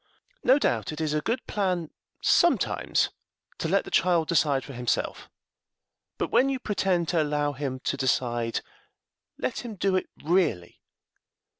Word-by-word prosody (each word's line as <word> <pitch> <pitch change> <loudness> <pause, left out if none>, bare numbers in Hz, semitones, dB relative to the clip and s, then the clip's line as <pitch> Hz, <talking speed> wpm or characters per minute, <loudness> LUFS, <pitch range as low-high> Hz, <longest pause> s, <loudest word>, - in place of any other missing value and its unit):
No 260 - +6
doubt 290 - 0
it 155 - -7
is 155 -2 -1
a 150 - +1
good 235 - -2
plan 180 -6 -1 0.3
sometimes - - +3 0.5
to - - -1
let - - +2
the - - -9
child 170 -2 +3
decide 145 -5 +2
for 135 - -9
himself, 125 -1 -2 0.9
but - - -2
when 270 - +4
you 270 - 0
pretend 190 -7 0
to 170 -3 +2
allow 145 -1 0
him 135 -1 -4
to 140 - -1
decide 120 -3 0 0.8
let - - -2
him 235 -3 -6
do 195 0 +1
it 185 - -1
really. 160 - 0
160 Hz, 150 wpm, -27 LUFS, 140-190 Hz, 0.9 s, No